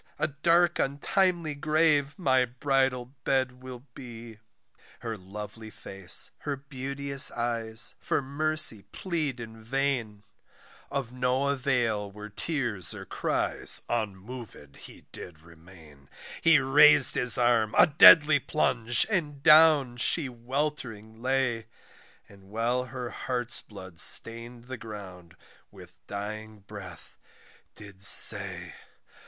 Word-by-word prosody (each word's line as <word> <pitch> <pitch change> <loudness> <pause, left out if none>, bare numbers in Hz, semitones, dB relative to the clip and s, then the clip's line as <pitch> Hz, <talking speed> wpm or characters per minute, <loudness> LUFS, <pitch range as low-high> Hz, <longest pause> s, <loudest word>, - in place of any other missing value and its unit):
a - - -1
dark 170 +4 +1
untimely 170 +3 -1
grave, 150 -1 0
my 130 -7 +1
bridal 130 0 -2
bed 130 -1 -2
will 130 -1 -10
be. 115 -3 -12 0.6
Her 115 -1 -5
lovely 105 +3 -10
face, 95 -3 -4
her 145 - -4
beauteous 140 0 0
eyes, 115 -2 -1
for - - -2
mercy 145 -4 0
plead 155 -8 -4
in 115 -1 -11
vain, 120 -4 -3 0.7
Of 135 -4 -5
no 125 +2 -1
avail 120 -7 -1
were 105 +1 -11
tears 120 - -2
or - - -10
cries - - 0
unmov'd 110 - -7
he - - -15
did 80 -3 -12
remain, 80 -4 -18 0.3
He 165 -1 +5
rais'd 140 +1 +5
his 125 +1 +1
arm, 120 -3 +1
a - - +7
deadly 155 -1 +6
plunge, 120 -5 +1
and 150 -9 -3
down 150 -5 +5
she 150 +4 +1
weltering 120 -3 -6
lay, 125 -3 -2 0.6
And 100 -1 -19
while 115 +5 -2
her 125 -1 -8
heart's 120 -2 -2
blood 95 -5 -13
stain'd 115 +1 +3
the 130 0 -8
ground, 95 -6 -11 0.3
with - - -17
dying 105 +1 -8
breath 95 -2 -12 0.6
did 100 -2 -13
say. 100 - +4
125 Hz, 115 wpm, -26 LUFS, 110-140 Hz, 0.7 s, a